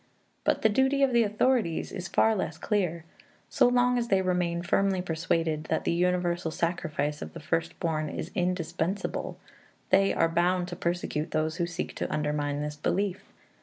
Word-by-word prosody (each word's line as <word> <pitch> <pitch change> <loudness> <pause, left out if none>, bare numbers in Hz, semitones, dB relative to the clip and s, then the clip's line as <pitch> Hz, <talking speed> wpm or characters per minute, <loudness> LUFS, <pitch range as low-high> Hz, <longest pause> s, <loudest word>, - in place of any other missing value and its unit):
But - - +1
the - - +7
duty 265 +5 +2
of 265 -2 +3
the 235 - +5
authorities 215 -4 +1
is 180 -1 -5
far 220 +5 +3
less 160 -5 -3
clear. 175 -6 -1 0.4
So - - +4
long 245 0 +3
as 235 - -2
they 195 -3 +2
remain 175 -2 0
firmly 195 +1 +2
persuaded 165 -2 -1
that - - -1
the - - +1
universal 175 -1 +1
sacrifice 155 -3 -2
of - - -7
the 165 - -7
first 165 +1 -2
born 155 -2 -1
is - - -5
indispensable, 180 +1 -2 0.5
they 195 0 +5
are 165 - +2
bound 175 +2 +1
to 175 - -5
persecute 170 -3 -2
those 155 +1 -1
who 170 - 0
seek 175 - -4
to - - -3
undermine 150 -1 -1
this 150 0 -5
belief. 190 +5 -1
175 Hz, 170 wpm, -28 LUFS, 160-195 Hz, 0.5 s, the